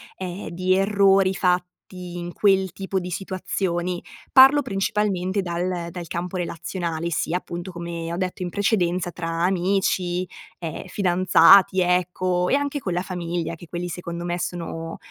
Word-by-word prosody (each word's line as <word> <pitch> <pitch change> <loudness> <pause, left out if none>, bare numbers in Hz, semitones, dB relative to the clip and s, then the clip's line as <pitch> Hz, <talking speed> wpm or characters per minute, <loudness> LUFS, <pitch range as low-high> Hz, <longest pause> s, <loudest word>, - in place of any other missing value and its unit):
ehm, 185 +1 -6
di 185 +2 +1
errori 195 -1 +4
fatti 180 -1 +2 0.5
in 175 0 -6
quel 190 -2 +2
tipo 190 0 -2
di 180 - -6
situazioni. 180 -1 -2 0.3
Parlo 270 +2 +8
principalmente 195 -4 -1
dal 175 -1 -2
dal 175 0 -7
campo 175 +3 -4
relazionale, 170 -1 -3
sia 165 +2 0
appunto, 175 0 -6
come 170 -1 -5
ho 170 - -3
detto 185 0 -3
in 180 - -3
precedenza 180 -3 0
tra 165 -1 -5 0.2
amici, 185 -1 0 0.3
ehm, 165 -3 -5
fidanzati, 185 0 +5
ecco, 180 0 +1
e - - +4
anche 285 0 -1
con 190 - -4
la 175 +1 0
famiglia, 175 -2 -3
che 165 +1 -13
quelli 175 0 -4
secondo 170 0 -5
me 175 0 -1
sono 165 -2 -5
180 Hz, 145 wpm, -23 LUFS, 175-190 Hz, 0.5 s, Parlo